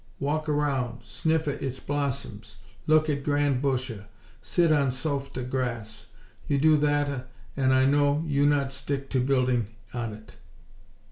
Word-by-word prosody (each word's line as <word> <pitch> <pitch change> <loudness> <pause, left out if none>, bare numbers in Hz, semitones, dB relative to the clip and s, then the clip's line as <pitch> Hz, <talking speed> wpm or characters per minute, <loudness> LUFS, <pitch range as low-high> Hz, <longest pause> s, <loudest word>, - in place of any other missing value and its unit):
_ - - -33 0.2
Walk 155 +2 -1
around; 135 -6 -1
sniffa 160 +5 -1
its 130 -1 -3
blossoms; 130 -7 -3 0.3
look 155 0 +4
at 140 -2 -1
grand 145 -3 +1
busha; 130 -6 -2 0.3
sit 170 -2 +2
on 145 -3 +3
softa 135 -1 -3
grass! 120 -4 -3 0.4
You 140 - +2
do 155 +2 +5
thatta, 145 -3 +1 0.3
an' 130 -1 +2
I 130 0 +4
know 145 +2 +3
you 145 -2 +2
not 140 -2 +2
stick 135 0 -3
no 130 - +3
building 125 -4 +2 0.3
on 115 -3 -3
it!!" 110 +1 -14
140 Hz, 145 wpm, -27 LUFS, 125-145 Hz, 0.4 s, do